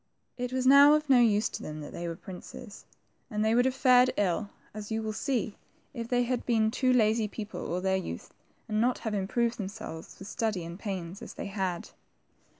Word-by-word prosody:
It 250 0 -4
was 260 0 -1
now 280 +2 +8
of 305 0 -1
no 255 - +7
use 220 -3 +4
to - - -7
them 155 0 -6
that 145 - -9
they 170 - -4
were 165 - -4
princes, 190 +4 -10 0.4
and 215 -2 -1
they 220 - +3
would 245 +2 +4
have 260 0 +1
fared 255 -1 +5
ill, 200 +1 0 0.2
as 210 -1 -7
you 220 - 0
will 215 0 -3
see, 235 -4 -2 0.4
if 230 -1 -5
they 245 0 +2
had 245 0 -1
been 220 -2 +3
two 255 +1 +2
lazy 220 -2 +3
people 210 -3 -6
all 180 +1 -1
their 190 0 +1
youth, 85 - -6 0.3
and 215 0 0
not 245 +1 +2
have 220 - -1
improved 230 +5 0
themselves 190 -5 -7
with 195 - -10
study 215 -8 -2
and 170 +3 -8
pains, 190 -3 -5
as - - -9
they - - -5
had. 190 -3 -3
220 Hz, 210 wpm, -29 LUFS, 190-245 Hz, 0.4 s, now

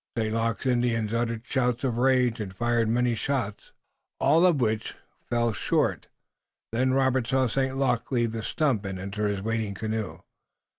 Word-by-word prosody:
St. 110 -1 0
Luc's 115 -1 -1
Indians 120 -3 +1
uttered 115 0 -1
shouts 125 -2 0
of 120 -3 0
rage 125 -2 +3
and 95 -3 -5
fired 120 0 +1
many 120 +1 +2
shots, 115 -3 -3 0.5
all 160 +6 +5
of 165 -6 +2
which 110 -2 -1 0.3
fell 120 -1 +1
short. - - 0 0.6
Then 130 +3 +1
Robert 130 -2 +2
saw 130 0 +2
St. 130 +2 -1
Luc 135 -3 0
leave 120 -3 +1
the 115 0 -4
stump 130 -2 0
and 95 -1 -4
enter 100 +3 -2
his 100 -2 -2
waiting 110 -2 -2
canoe. 110 0 -4
115 Hz, 160 wpm, -27 LUFS, 110-130 Hz, 0.6 s, all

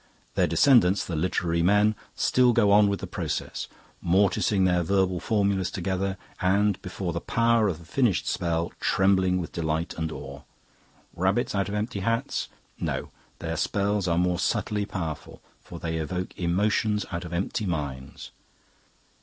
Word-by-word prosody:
Their - - +2
descendants, 115 -9 +4
the 85 - -4
literary 85 0 0
men, 105 +4 +4 0.2
still 125 -1 +3
go 105 -3 +4
on 105 0 +6
with 100 - -2
the - - -3
process, - - -4 0.4
morticing 95 +1 +2
their 90 -1 +3
verbal 95 0 +1
formulas 100 -4 +1
together, 95 +1 -2 0.2
and, 100 +2 +2
before 90 -2 -4
the 85 - -3
power 115 -2 +2
of 90 -5 -2
the 85 - -14
finished 100 +1 +1
spell, 85 -1 -1
trembling 95 -1 +2
with 85 - -5
delight 80 0 -2
and 80 -1 -2
awe. 70 -2 -8 0.7
Rabbits 95 +7 +1
out 100 0 0
of 100 - -3
empty 105 0 -2
hats? 115 +4 -1 0.3
No, - - -3 0.3
their - - -4
spells 100 -1 0
are 85 -1 +1
more 90 0 +1
subtly 105 0 -1
powerful, 80 -6 -5 0.2
for - - -9
they 80 -1 -3
evoke 90 +4 -4
emotions 105 +4 +1
out 85 0 -3
of 85 - -8
empty 95 +4 -2
minds. 70 -5 -5
95 Hz, 155 wpm, -26 LUFS, 85-105 Hz, 0.7 s, on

